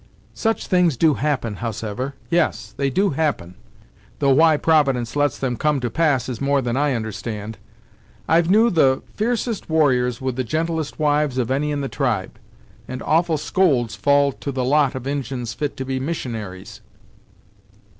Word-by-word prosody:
"Such 225 0 -1
things 180 -7 +2
do 155 +3 +4
happen, 130 -7 -2
howsever; 115 +4 -4 0.2
yes, 170 -2 0
they 140 -1 0
do 195 +8 +1
happen; 140 - -1 0.6
though 140 -1 +2
why 155 +3 +5
providence 135 -7 +2
lets 145 -2 +1
them 130 -2 -2
come 150 +1 +1
to 120 -3 -3
pass 145 -5 +1
is 125 -1 -5
more 140 0 +2
than 120 -2 -2
I 145 -1 +1
understand. 110 -1 -5 0.7
I've 165 +1 +3
knew 220 +4 +5
the 135 -6 +3
f'ercest 230 -2 -2
warriors 125 -6 +2
with 130 -2 -3
the 130 - 0
gentlest 160 +3 -2
wives 150 -3 +1
of 125 -1 -1
any 145 +3 0
in 145 -1 -2
the 135 - -2
tribe, 120 -10 -2 0.5
and 130 0 -6
awful 165 0 +2
scolds 145 -7 +1
fall 140 0 +3
to 140 - -6
the 130 -1 -2
lot 140 0 +2
of 130 -1 -6
Injins 135 -4 -3
fit 145 +4 -4
to 130 - -4
be 130 0 -2
missionaries." 115 - -5
140 Hz, 165 wpm, -21 LUFS, 125-155 Hz, 0.7 s, why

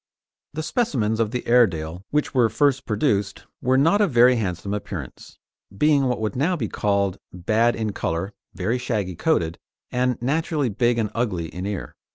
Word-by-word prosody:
The 155 - -3
specimens 120 - 0
of 115 -2 +1
the 125 +2 -4
Airedale 90 -8 +2
which 150 0 0
were 120 -4 +4
first 140 +1 +1
produced 105 -2 0 0.2
were 130 +1 +2
not 165 +10 +4
of 205 - +3
very 125 -1 +5
handsome 100 -3 -3
appearance, 105 - -7 0.4
being 150 0 +3
what 125 -1 0
would 110 -2 -2
now 160 +8 +1
be 125 -10 -2
called 100 -2 0
bad 110 +7 +1
in 110 -2 -2
colour, 95 +3 -3 0.2
very 110 +7 -1
shaggy 105 -7 -2
coated, 85 - 0 0.3
and 125 0 0
naturally 145 +1 0
big 120 +3 +1
and 110 -3 -1
ugly 95 -9 -2
in 90 +4 -5
ear. 100 -3 -5
115 Hz, 170 wpm, -23 LUFS, 100-130 Hz, 0.4 s, very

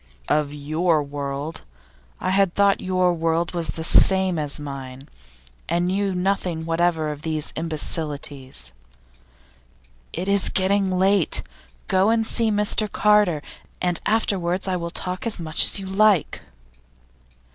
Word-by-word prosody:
'Of 150 -2 +1
your 155 +2 0
world? 140 +2 -5 0.6
I - - -1
had 195 -2 +2
thought 200 -1 +3
your 185 -1 +1
world 165 0 -1
was 170 -2 -2
the 160 - -5
same 190 0 +4
as 150 -1 +1
mine, 135 -1 -8 0.6
and 170 +1 +1
knew 195 +1 -1
nothing 180 -3 -1
whatever 165 -2 0
of 150 -1 -8
these 155 -1 -3
imbecilities.' 145 - -3 1.4
'It 185 - -4
is 200 -1 +2
getting 195 +1 +1
late. 190 -1 +2 0.4
Go 190 +2 +2
and 225 0 +2
see 225 0 +2
Mr 210 0 +1
Carter, 210 -7 +3 0.4
and 175 -1 0
afterwards 190 -4 0
I 185 - 0
will 170 -1 -4
talk 180 +4 -4
as 220 - -2
much 160 -2 +3
as - - +3
you 195 - -5
like. 195 -2 +2
175 Hz, 135 wpm, -22 LUFS, 155-195 Hz, 1.4 s, same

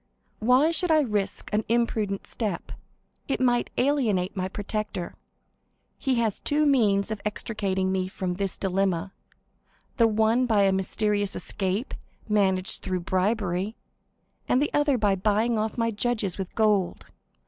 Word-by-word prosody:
Why 255 +8 +4
should 335 +2 +1
I 310 -1 +5
risk 205 -6 -2
an 215 +1 +2
imprudent 220 -4 0
step? 215 -4 -4 0.6
It 275 - -1
might 245 -2 +2
alienate 225 -9 +1
my 185 -1 -1
protector. 205 -2 -4 0.9
He 265 -2 +1
has 225 -4 0
two 300 +1 +1
means 220 -8 +3
of 215 - -4
extricating 200 -3 -1
me 185 -1 0
from 185 -1 -3
this 195 0 -3
dilemma,—the 195 +4 -3
one 220 +3 +2
by 210 -3 +3
a 195 - +4
mysterious 205 +1 0
escape, 195 +5 -2 0.3
managed 190 -3 +1
through 185 -1 -2
bribery; 190 +2 0 0.7
the 280 +4 +1
other 290 -2 +3
by 205 -3 +2
buying 215 +4 +1
off 215 +2 -2
my 230 -1 +1
judges 215 -4 -1
with 190 - -5
gold. 210 -5 +1
210 Hz, 135 wpm, -26 LUFS, 190-235 Hz, 0.9 s, I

